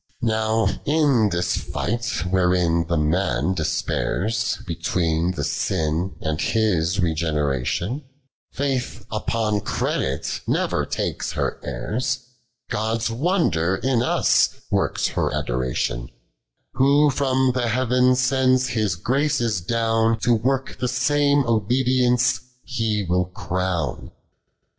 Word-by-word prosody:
Now 110 0 +1 0.2
in 140 -8 +3
this 85 -1 0
fight, 115 +2 -2
wherein 90 -3 +2
the 85 -1 0
maD 80 0 +1
deapuira 85 +5 -1 0.3
Between 85 0 0
the 75 - -3
sin 80 +3 -1
and 80 +1 -2
his 100 -6 +1
rcgreneration; 80 - -1 0.5
Faith 135 -3 -2
upon 110 -1 -1
credit 70 -6 -2
ncrer - - 0
takes - - -2
her - - -2
heirs, 125 +2 -3 0.5
Goil's 110 +1 -1
wonder 115 - +1
in 130 +3 0
ua 120 - 0 0.5
works - - +1
her - - 0
atlomtion: - - -2 0.7
Who 140 +2 +4
from 130 -1 +2
the 125 -1 0
heaven 125 +2 +3
sends 130 0 +2
His 110 -7 0
graces 120 - 0
dn' 115 +3 +1
To 120 - +3
work 130 +4 -1
the 125 - 0
same 140 +3 +2
obedienee 125 +1 +2 0.2
He 110 -5 -1
will 90 +1 +1
crow 90 -2 -2
105. - - -10
110 Hz, 110 wpm, -23 LUFS, 85-125 Hz, 0.7 s, Who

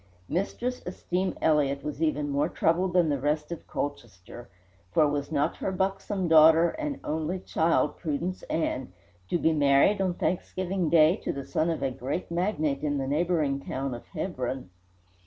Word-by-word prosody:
Mistress 240 +7 -2
Esteem 180 +1 -2
Elliott 140 -3 +2
was 150 0 -5
even 150 -2 +1
more 140 +1 +1
troubled 175 +2 +1
than 175 -3 +4
the 140 -2 0
rest 150 +3 -1
of 170 - -7
Colchester, 120 -5 -6 0.4
for 155 -2 +4
was 145 0 -2
not 145 -2 0
her - - -2
buxom 190 0 -1
daughter, 160 +1 +7
and 300 -2 -4
only 160 +4 -2
child, 165 -2 +1
Prudence 170 +3 -3
Ann, 130 - -2 0.4
to - - +2
be 160 -1 +2
married 145 +7 +4
on 185 -2 0
Thanksgiving 180 +1 -1
Day 160 +3 +5
to - - -3
the 140 -1 -6
son 160 +2 0
of 165 - -2
a 135 - 0
great 135 +8 -4
magnate 165 -6 0
in 145 -1 0
the 135 - -2
neighbouring 150 -1 +1
town 135 -1 -4
of 120 - -9
Hebron? 130 - -4
160 Hz, 165 wpm, -27 LUFS, 140-180 Hz, 0.4 s, daughter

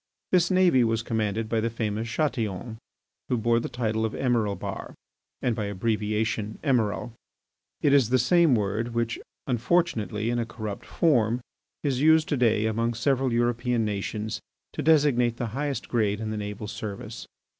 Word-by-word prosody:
This 180 -2 +4
navy 185 -9 +4
was 115 0 0
commanded 110 -1 -1
by 115 0 0
the 115 +1 0
famous 110 0 -3
Chatillon, 115 - -2 0.5
who 125 - +2
bore 115 +1 +2
the - - -4
title 110 -2 -1
of 110 - -1
Emiralbahr, 115 -6 -1 0.5
and 120 - +1
by 105 - -2
abbreviation 110 +1 -1
Emiral. 120 -5 +1 0.7
It 140 - +3
is 135 -6 +5
the 130 - +4
same 160 +3 +4
word 110 +3 -1
which, 115 -1 -1 0.3
unfortunately 120 -5 0
in 120 - 0
a 115 - 0
corrupt 110 -3 -6
form, 120 -8 +2 0.4
is 135 -3 0
used 160 +1 +5
to 145 - +1
day 110 -3 +3
among 115 +2 0
several 130 +1 +1
European 120 0 +1
nations 105 +1 -3 0.3
to - - -3
designate 140 -6 +3
the 120 -2 -2
highest 140 0 -2
grade 105 -3 +1
in 110 -1 -3
the - - -3
naval 105 0 -5
service. 105 +1 -6
115 Hz, 155 wpm, -26 LUFS, 110-130 Hz, 0.7 s, is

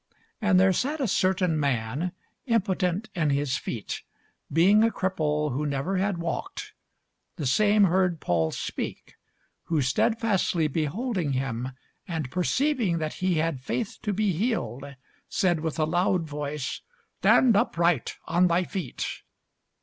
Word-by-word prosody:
And 205 -4 +4
there 190 0 +5
sat 290 - -1
a 265 - +1
certain 185 -4 +1
man, 140 +5 -1 0.3
impotent 200 -2 0
in 165 -5 +1
his 140 -1 +1
feet, 110 -4 -5 0.5
being 190 +8 +5
a 230 - +4
cripple 150 - -1
who 145 +4 -1
never 145 +6 -1
had 195 0 0
walked: 170 - -4 0.6
the 155 - -4
same 205 +10 +4
heard 185 -2 +2
Paul 80 - +1
speak: - - -5 0.5
who 165 -2 0
stedfastly 190 - +1
beholding 165 - -1
him, 130 -1 -2 0.3
and 160 -7 -3
perceiving 230 - +1
that 155 -1 -2
he 185 -1 +2
had 155 -4 0
faith 210 - -3
to 210 - -1
be 205 0 +1
healed, 180 - -2 0.4
said 175 -4 +1
with 160 0 -3
a 155 - +2
loud 175 +2 +1
voice, 145 -2 -4 0.4
Stand 245 -5 +5
upright 170 - +1
on 180 +1 +3
thy 175 +1 +2
feet. 185 0 -4
175 Hz, 135 wpm, -26 LUFS, 150-195 Hz, 0.6 s, there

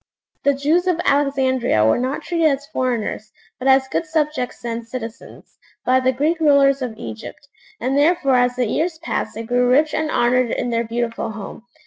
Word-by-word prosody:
The 280 0 +3
Jews 315 +6 +1
of 355 -2 +1
Alexandria 265 - +2
were 110 - +3
not 260 +3 -2
treated 335 -2 +1
as 280 -1 0
foreigners, 240 -6 -3 0.3
but 255 - -3
as 265 0 +4
good 320 - -2
subjects 300 -6 -2
and 230 0 -3
citizens, 230 -1 -9 0.3
by 255 +1 +4
the 260 0 +2
Greek 300 +6 0
rulers 280 -3 +4
of 235 -4 -4
Egypt, 115 - -9 0.3
and 260 +3 -1
therefore 290 -2 +3
as 245 0 +3
the 250 -1 0
years 320 +9 -1
passed 335 - -3
they 225 - -5
grew 245 +2 +1
rich 300 +4 +3
and 310 0 -1
honoured 250 -2 +2
in 245 - -2
their 230 0 -1
beautiful 230 0 -3
home. 215 +2 -9
260 Hz, 180 wpm, -20 LUFS, 240-290 Hz, 0.3 s, as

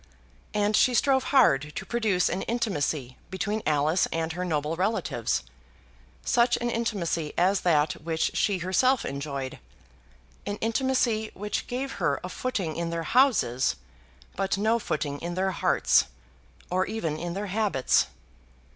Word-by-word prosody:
And 210 0 +2
she 250 +2 +4
strove 265 0 +3
hard 150 - +3
to - - -4
produce 215 -6 +1
an 185 - -2
intimacy 155 - -1
between 205 +3 -2
Alice 155 +3 +2
and 165 0 -2
her 180 +2 -3
noble 155 -2 -1
relatives 165 - -1 0.8
such 240 0 +3
an 240 0 -2
intimacy 180 -10 -2
as 185 +2 +3
that 155 -3 +3
which 160 0 0
she 200 -2 +2
herself 210 +9 +2
enjoyed; 140 -1 -4 0.9
an 205 - -1
intimacy 230 -1 0
which 210 +1 -3
gave 265 +2 -3
her - - +1
a - - -5
footing 200 -12 -3
in 170 0 -2
their 165 0 -3
houses 160 - +3 0.6
but 195 0 0
no 220 +3 +2
footing 145 -7 -3
in 175 +1 -4
their 190 +1 +1
hearts, - - +3 0.7
or 185 +1 +1
even 170 -9 -2
in 175 0 -4
their 200 +1 -3
habits. 205 -12 +2
185 Hz, 140 wpm, -27 LUFS, 155-225 Hz, 0.9 s, she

